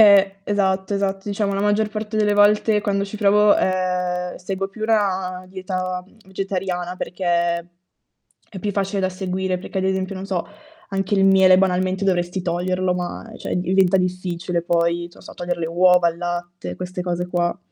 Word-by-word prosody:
Eh, 195 -2 +6
esatto. 190 -1 0
Esatto, 195 0 -2
diciamo 200 0 -1
la 195 - -1
maggior 210 +1 +2
parte 215 0 -4
delle 210 -1 +3
volte 210 +1 +4
quando 200 -1 0
ci 200 +2 -7
provo, 210 0 +5
ehm, 180 -1 -1
seguo 195 +1 -4
più 205 +2 -10
una 190 -4 0
dieta 185 -1 -4 0.2
vegetariana, 185 -2 -3
perché 185 0 -6 1.2
è 195 - -8
più 205 - -1
facile 195 0 -1
da 185 - +1
seguire, 185 0 -2
perché 190 +1 -5
ad 190 - -1
esempio, 190 0 -1
non 190 0 -6
so, 190 -3 -2 0.4
anche 195 +1 -1
il 195 - +4
miele, 190 -1 +6
banalmente, 185 +1 +1
dovresti 180 -1 0
toglierlo, 180 +1 0
ma 180 +5 -5
cioè - - -3
diventa 185 +1 +3
difficile 180 -1 -2
poi, 170 0 +1
non - - -16
so, - - -12
togliere 175 0 -3
le 165 - -2
uova, 180 +1 +4
il 165 - -11
latte, 175 0 -4
queste 180 0 -5
cose 180 0 -2
qua. 175 -1 -1
185 Hz, 170 wpm, -22 LUFS, 180-195 Hz, 1.2 s, Eh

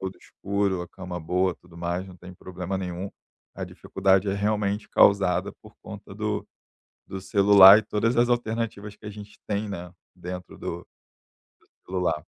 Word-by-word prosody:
todo 95 0 -5
escuro, 100 -2 -2
a 90 - -9
cama 90 0 -7
boa, 90 +2 0
tudo 90 -1 -19
mais, 85 +2 -3
não 90 -1 -12
tem 90 +1 -12
problema 90 +1 -5
nenhum. 90 +1 -4 0.5
A - - -4
dificuldade 95 +1 +1
é 95 - 0
realmente 105 0 -1
causada 100 -2 +3
por - - -16
conta - - -10
do - - -2 0.6
do 95 - -6
celular 100 0 +8
e - - -2
todas 110 +3 0
as 120 +1 +4
alternativas 110 -3 -2
que 105 - -14
a - - -5
gente 105 0 -12
tem, 105 0 -2
né, 90 -2 -7 0.2
dentro 90 0 -8
do 85 - -5
do - - -19 1.0
celular, 90 -4 -1
95 Hz, 165 wpm, -25 LUFS, 90-105 Hz, 1.0 s, celular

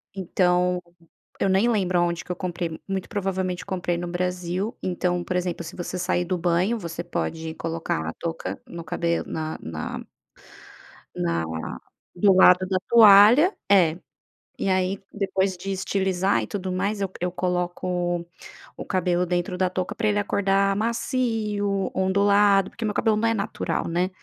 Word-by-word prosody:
Então 180 -1 +1 0.6
eu 195 - +2
nem 195 +5 +3
lembro 185 -5 +1
aonde 170 -1 0
que - - -7
eu - - -2
comprei, 175 -3 -4
muito 195 -1 -3
provavelmente 185 -3 -2
comprei 180 -3 -2
no 175 0 -4
Brasil. 180 +4 -2
Então, 180 -1 -1
por 180 - -3
exemplo, 175 -1 -2
se 165 - -9
você 180 +1 -5
sair 180 0 0
do 180 0 -1
banho, 180 +7 +1
você 170 -3 -5
pode 160 -2 -4
colocar 160 - -3
a 80 - -3
touca 165 -1 -5
no 170 -1 -8
cabelo 170 +1 -1
na 155 0 -3
na 80 -1 -5 1.1
na 85 -2 -1 0.7
do 195 +2 +5
lado 185 0 +6
da 185 -1 +1
toalha, 230 - +7 0.2
é. 175 -4 +5 0.6
E 195 - -1
aí, 185 +1 +1
depois 190 -2 -1
de 195 +2 -5
estilizar 190 0 0
e - - -6
tudo 190 -3 -4
mais, 200 +3 -1 0.2
eu 180 0 0
coloco 180 -1 -1 0.5
o - - -6
cabelo 180 -1 +1
dentro 180 +1 -2
da 185 -1 +1
touca 185 0 -3
para 220 -2 0
ele 205 0 +2
acordar 195 -1 +1
macio, 215 -3 -1
ondulado, 200 +1 +3
porque 230 - -6
meu 210 - -1
cabelo 220 0 +2
não 230 +2 +1
é 225 - +2
natural, 210 0 -2
né? 175 +2 0
185 Hz, 155 wpm, -24 LUFS, 175-200 Hz, 1.1 s, toalha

